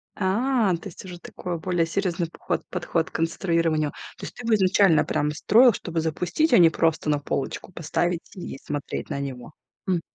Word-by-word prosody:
А, 210 Hz, 0 st, +2 dB
то -, -, -8 dB
есть 165 Hz, -, -12 dB
уже 175 Hz, -2 st, -8 dB
такой 175 Hz, 0 st, -5 dB
более 175 Hz, -1 st, +1 dB
серьёзный 175 Hz, -1 st, -1 dB
поход -, -, -3 dB
подход 165 Hz, -2 st, -1 dB
к -, -, -31 dB
конструированию. 165 Hz, -2 st, +1 dB, 0.3 s
То -, -, -7 dB
есть -, -, -9 dB
ты 245 Hz, -, -8 dB
бы 230 Hz, -, +2 dB
изначально 190 Hz, -3 st, +4 dB
прям 150 Hz, +1 st, 0 dB
строил, 230 Hz, -, +5 dB
чтобы 170 Hz, -4 st, -3 dB
запустить, 175 Hz, -, 0 dB
а -, -, +8 dB
не 165 Hz, -2 st, +8 dB
просто 160 Hz, -1 st, 0 dB
на 145 Hz, -1 st, +2 dB
полочку 140 Hz, +5 st, -4 dB
поставить 170 Hz, +1 st, -2 dB
и 175 Hz, -6 st, -7 dB
смотреть 145 Hz, -1 st, -4 dB
на 140 Hz, -, -3 dB
него, 130 Hz, -1 st, -6 dB, 0.3 s
м. 180 Hz, -3 st, +1 dB
170 Hz, 185 wpm, -25 LUFS, 160-190 Hz, 0.3 s, а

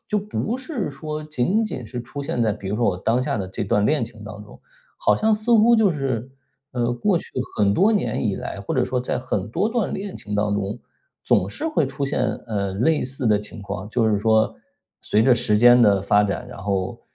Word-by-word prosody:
就 210 Hz, -, +1 dB
不 210 Hz, +4 st, -3 dB
是 260 Hz, -, -4 dB
说 155 Hz, +2 st, -6 dB
仅 155 Hz, -, 0 dB
仅 130 Hz, -, -5 dB
是 120 Hz, +3 st, -6 dB
出 140 Hz, +4 st, -7 dB
现 120 Hz, -3 st, -1 dB
在， 110 Hz, -2 st, +2 dB
比 100 Hz, -2 st, -8 dB
如 105 Hz, -, -1 dB
说 120 Hz, -, +1 dB
我 90 Hz, -, +1 dB
当 115 Hz, +6 st, +1 dB
下 115 Hz, -, -1 dB
的 95 Hz, -, -3 dB
这 95 Hz, -, -4 dB
段 105 Hz, 0 st, +2 dB
恋 145 Hz, -6 st, +2 dB
情 110 Hz, -2 st, -12 dB
当 105 Hz, 0 st, -8 dB
中， -, -, -15 dB, 0.4 s
好 -, -, +3 dB
像 220 Hz, 0 st, +2 dB
似 215 Hz, +3 st, 0 dB
乎 230 Hz, +2 st, +6 dB
就 205 Hz, -5 st, +4 dB
是， 130 Hz, -4 st, -2 dB, 0.4 s
呃， 120 Hz, -1 st, 0 dB
过 180 Hz, -, +1 dB
去 -, -, -9 dB, 0.3 s
很 100 Hz, -1 st, +4 dB
多 215 Hz, +4 st, +4 dB
年 205 Hz, -, 0 dB
以 100 Hz, -, 0 dB
来， -, -, -6 dB
或 100 Hz, -, -4 dB
者 130 Hz, -, +2 dB
说 125 Hz, 0 st, -1 dB
在 125 Hz, -, -2 dB
很 105 Hz, -5 st, -3 dB
多 205 Hz, -, 0 dB
段 230 Hz, -3 st, -1 dB
恋 195 Hz, 0 st, -5 dB
情 105 Hz, 0 st, -6 dB
当 105 Hz, 0 st, +1 dB
中， 100 Hz, -1 st, -2 dB, 0.5 s
总 95 Hz, -, +2 dB
是 320 Hz, -, -3 dB
会 310 Hz, -, +1 dB
出 140 Hz, -, -3 dB
现， 140 Hz, -, -1 dB, 0.3 s
呃， 100 Hz, -3 st, -1 dB
类 145 Hz, +7 st, +2 dB
似 130 Hz, -1 st, -3 dB
的 105 Hz, -1 st, +4 dB
情 105 Hz, 0 st, -9 dB
况。 100 Hz, 0 st, -6 dB
就 115 Hz, -2 st, +2 dB
是 105 Hz, -2 st, +2 dB
说 110 Hz, 0 st, +2 dB, 0.5 s
随 110 Hz, -, +2 dB
着 130 Hz, -, +5 dB
时 115 Hz, -3 st, +1 dB
间 120 Hz, +2 st, +7 dB
的 100 Hz, -4 st, +4 dB
发 105 Hz, +1 st, +3 dB
展， 100 Hz, -, -3 dB
然 -, -, -10 dB
后 95 Hz, -1 st, -2 dB
120 Hz, 250 characters per minute, -22 LUFS, 105-155 Hz, 0.5 s, 间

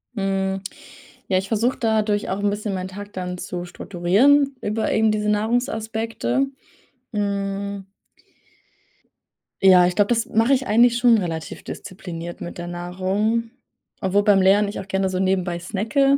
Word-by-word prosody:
Hm. 195 Hz, -1 st, -1 dB, 0.7 s
Ja, 190 Hz, -, +2 dB
ich 190 Hz, +1 st, -2 dB
versuche 230 Hz, +4 st, 0 dB
dadurch 215 Hz, -2 st, +1 dB
auch 190 Hz, -, -2 dB
'n 205 Hz, 0 st, +1 dB
bisschen 205 Hz, 0 st, -3 dB
meinen 185 Hz, -1 st, -3 dB
Tag 205 Hz, +2 st, -9 dB
dann 180 Hz, -1 st, -4 dB
zu 175 Hz, 0 st, -5 dB
strukturieren 210 Hz, +12 st, +2 dB
über 215 Hz, +1 st, -1 dB
eben 220 Hz, 0 st, +3 dB
diese 210 Hz, 0 st, 0 dB
Nahrungsaspekte. 225 Hz, +3 st, -1 dB, 0.7 s
Hm 200 Hz, -1 st, -2 dB, 1.8 s
Ja, 180 Hz, -2 st, +7 dB
ich 180 Hz, -, -2 dB
glaube, 205 Hz, -1 st, +3 dB
das 230 Hz, 0 st, 0 dB
mache 225 Hz, +3 st, +2 dB
ich 265 Hz, -1 st, 0 dB
eigentlich 235 Hz, +2 st, +4 dB
schon 240 Hz, -1 st, +5 dB
relativ 165 Hz, -5 st, -4 dB
diszipliniert 175 Hz, -3 st, -8 dB
mit 175 Hz, -, -7 dB
der 175 Hz, 0 st, -6 dB
Nahrung, 190 Hz, +6 st, -1 dB, 0.5 s
obwohl 195 Hz, 0 st, +2 dB
beim 200 Hz, -3 st, +5 dB
Lernen 200 Hz, +2 st, +4 dB
ich 205 Hz, -, -5 dB
auch 190 Hz, -, -13 dB
gerne 190 Hz, -1 st, +1 dB
so 185 Hz, -1 st, -2 dB
nebenbei 185 Hz, -2 st, 0 dB
snacke. 225 Hz, +10 st, +1 dB
205 Hz, 150 wpm, -22 LUFS, 185-225 Hz, 1.8 s, Ja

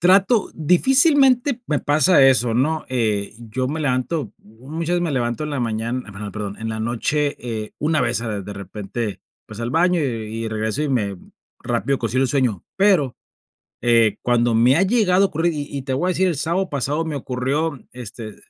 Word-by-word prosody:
Trato 195 Hz, +5 st, +4 dB
difícilmente 260 Hz, -, +4 dB
me 150 Hz, -, +1 dB
pasa 155 Hz, +3 st, +4 dB
eso, 125 Hz, -3 st, +3 dB
¿no?, 150 Hz, +6 st, 0 dB
eh, 110 Hz, -5 st, -1 dB
yo 120 Hz, +2 st, -3 dB
me 155 Hz, +3 st, -3 dB
levanto, 135 Hz, +2 st, -1 dB
muchas 150 Hz, +11 st, -5 dB
veces 175 Hz, -, +1 dB
me 170 Hz, -, -1 dB
levanto 120 Hz, +1 st, -1 dB
en 150 Hz, -, -4 dB
la 140 Hz, -3 st, -2 dB
mañana, 115 Hz, 0 st, -3 dB
bueno, 100 Hz, 0 st, -7 dB
perdón, 105 Hz, -1 st, -5 dB
en 110 Hz, 0 st, -4 dB
la 110 Hz, 0 st, -4 dB
noche, 140 Hz, +6 st, -1 dB
eh, 110 Hz, -3 st, -5 dB
una 155 Hz, 0 st, +1 dB
vez 120 Hz, -2 st, 0 dB
a 105 Hz, -3 st, -3 dB
de 100 Hz, +1 st, -7 dB
repente, 100 Hz, +2 st, -5 dB, 0.3 s
pues, 110 Hz, +1 st, -9 dB
al 115 Hz, -, -2 dB
baño 175 Hz, +4 st, +2 dB
y 115 Hz, -5 st, -3 dB
y 110 Hz, -, -2 dB
regreso, 110 Hz, +5 st, -2 dB
y 150 Hz, -, -1 dB
me 105 Hz, -8 st, -1 dB, 0.4 s
rápido 125 Hz, +3 st, -1 dB
consigo 125 Hz, +3 st, 0 dB
un 130 Hz, -, +1 dB
sueño, 125 Hz, -8 st, 0 dB
pero, 190 Hz, -10 st, +3 dB, 0.7 s
eh, 115 Hz, -3 st, +3 dB
cuando 120 Hz, -1 st, +2 dB
me 120 Hz, +4 st, +5 dB
ha -, -, +3 dB
llegado 195 Hz, -2 st, +3 dB
a -, -, +2 dB
ocurrir, 165 Hz, 0 st, 0 dB
y 145 Hz, -2 st, -4 dB
y 135 Hz, -, -5 dB
te 130 Hz, -, -3 dB
voy 140 Hz, +8 st, 0 dB
a -, -, +2 dB
decir, 185 Hz, +1 st, +2 dB
el 170 Hz, -, 0 dB
sábado 180 Hz, +5 st, -1 dB
pasado 145 Hz, +4 st, -1 dB
me 160 Hz, -2 st, -3 dB
ocurrió, 140 Hz, +4 st, -2 dB
este, 115 Hz, -3 st, -8 dB
130 Hz, 195 wpm, -21 LUFS, 115-160 Hz, 0.7 s, me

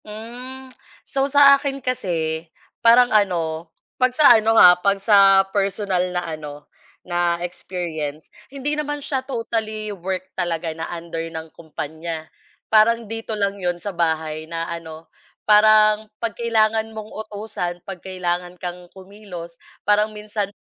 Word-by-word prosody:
Mm. 250 Hz, +5 st, -9 dB, 0.3 s
So, 275 Hz, 0 st, -1 dB
sa 280 Hz, 0 st, +7 dB
akin 275 Hz, 0 st, -3 dB
kasi 170 Hz, -11 st, -3 dB, 0.3 s
parang 245 Hz, +1 st, +6 dB
ano, 170 Hz, -5 st, 0 dB, 0.3 s
'pag 255 Hz, 0 st, +2 dB
sa 305 Hz, -, +8 dB
ano 225 Hz, 0 st, +3 dB
ha, 180 Hz, -, +9 dB
'pag 200 Hz, +1 st, +2 dB
sa 195 Hz, -1 st, +6 dB
personal 195 Hz, -2 st, 0 dB
na 180 Hz, -1 st, -3 dB
ano, 150 Hz, -2 st, -7 dB, 0.4 s
na 175 Hz, -1 st, 0 dB
experience. 160 Hz, -4 st, -5 dB, 0.2 s
Hindi 280 Hz, +2 st, -3 dB
naman 295 Hz, -1 st, -3 dB
siya 265 Hz, -2 st, -1 dB
totally 220 Hz, -4 st, -3 dB
work 185 Hz, 0 st, -4 dB
talaga 170 Hz, -2 st, -2 dB
na 165 Hz, +1 st, -6 dB
under 165 Hz, -1 st, -5 dB
ng 160 Hz, 0 st, -7 dB
kumpanya. 160 Hz, 0 st, -6 dB, 0.4 s
Parang 230 Hz, +2 st, +4 dB
dito 225 Hz, +1 st, -5 dB
lang 200 Hz, -1 st, -1 dB
'yon 175 Hz, -1 st, -1 dB
sa 200 Hz, +3 st, -6 dB
bahay 160 Hz, -2 st, -2 dB
na 165 Hz, 0 st, -3 dB
ano, 160 Hz, -1 st, -9 dB, 0.4 s
parang 215 Hz, 0 st, +5 dB
'pag 230 Hz, -1 st, -3 dB
kailangan 220 Hz, -1 st, +1 dB
mong 215 Hz, 0 st, -7 dB, 0.2 s
utusan, 200 Hz, -4 st, -5 dB
'pag 190 Hz, -2 st, -8 dB
kailangan 180 Hz, -1 st, -3 dB
kang 175 Hz, 0 st, -7 dB
kumilos, 190 Hz, -3 st, -10 dB, 0.3 s
parang 210 Hz, +1 st, +2 dB
minsan 210 Hz, -1 st, -3 dB
195 Hz, 135 wpm, -21 LUFS, 170-220 Hz, 0.4 s, ha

